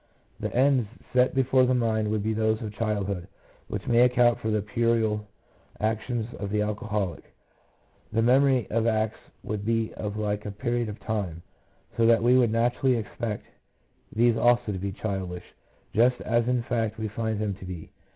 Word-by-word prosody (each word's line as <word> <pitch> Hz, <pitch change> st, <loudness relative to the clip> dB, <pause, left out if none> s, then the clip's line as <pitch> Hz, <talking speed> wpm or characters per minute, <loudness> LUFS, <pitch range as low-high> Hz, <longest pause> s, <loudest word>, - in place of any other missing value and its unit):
The -, -, -3 dB
ends 130 Hz, -4 st, +3 dB, 0.2 s
set 125 Hz, 0 st, +3 dB
before 130 Hz, -1 st, +4 dB
the 130 Hz, -, +2 dB
mind 110 Hz, -3 st, +1 dB
would 105 Hz, -1 st, -1 dB
be 110 Hz, +1 st, 0 dB
those 110 Hz, 0 st, +1 dB
of 105 Hz, -1 st, -5 dB
childhood, 100 Hz, -4 st, -2 dB, 0.4 s
which -, -, -5 dB
may 120 Hz, 0 st, +3 dB
account 125 Hz, -1 st, +4 dB
for 110 Hz, -, -2 dB
the 105 Hz, -2 st, +1 dB
puerile 110 Hz, -1 st, 0 dB, 0.5 s
actions 110 Hz, +2 st, -1 dB
of 100 Hz, -, -3 dB
the 105 Hz, +1 st, +1 dB
alcoholic; 105 Hz, -3 st, -2 dB, 0.9 s
the 115 Hz, -, +1 dB
memory 130 Hz, 0 st, +4 dB
of 115 Hz, +1 st, +1 dB
acts 110 Hz, -1 st, 0 dB, 0.2 s
would 105 Hz, -1 st, -4 dB
be 115 Hz, 0 st, 0 dB
of 105 Hz, -1 st, -5 dB
a 110 Hz, -, -3 dB
like 105 Hz, -1 st, -3 dB
period 120 Hz, -1 st, -1 dB
of 105 Hz, -, -7 dB
time, 95 Hz, -7 st, -3 dB, 0.5 s
so 115 Hz, -1 st, +4 dB
that 115 Hz, -1 st, +4 dB
we 125 Hz, +2 st, +5 dB
would 125 Hz, -3 st, +4 dB
naturally 120 Hz, +3 st, +2 dB
expect 110 Hz, 0 st, -4 dB, 0.7 s
these 120 Hz, +1 st, +3 dB
also 120 Hz, -1 st, +3 dB
to 95 Hz, -, -4 dB
be 100 Hz, +1 st, -3 dB
childish, 95 Hz, -3 st, -4 dB, 0.5 s
just 120 Hz, +2 st, +3 dB
as 120 Hz, +1 st, +1 dB
in 125 Hz, -1 st, +1 dB
fact 115 Hz, -3 st, -1 dB
we 110 Hz, 0 st, -2 dB
find 110 Hz, +1 st, -2 dB
them 105 Hz, -2 st, -1 dB
to 95 Hz, -, -10 dB
be. 90 Hz, -3 st, -8 dB
110 Hz, 175 wpm, -26 LUFS, 105-120 Hz, 0.9 s, we